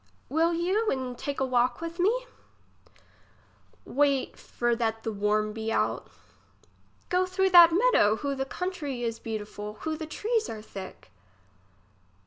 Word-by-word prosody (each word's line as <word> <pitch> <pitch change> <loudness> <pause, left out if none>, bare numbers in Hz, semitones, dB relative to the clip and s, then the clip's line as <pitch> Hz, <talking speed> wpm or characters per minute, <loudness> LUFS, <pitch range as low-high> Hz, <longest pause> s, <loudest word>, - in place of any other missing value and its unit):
Will 325 +3 +2
you 375 +6 0
and 260 -2 -2
take 280 +3 -4
a 265 - +1
walk 250 -1 +1
with 335 +1 -6
me? 465 +8 +2 1.6
Wait 280 -1 +1
for 240 -1 -1
that 225 -1 -2
the 225 - -3
wanu 210 +1 0
be 225 0 -3
out. - - -1 1.0
Go 365 +1 +2
through 380 +1 +1
that 345 -2 +9
meadow. 350 - +4
Who 280 +4 -3
the 270 0 -2
country 295 -6 -4
is 230 -1 -2
beautiful! 210 -1 -6
who 315 -1 -2
the 315 0 -6
trees 445 +7 -1
are 215 -1 -7
thick 190 - -10
275 Hz, 140 wpm, -27 LUFS, 225-350 Hz, 1.6 s, that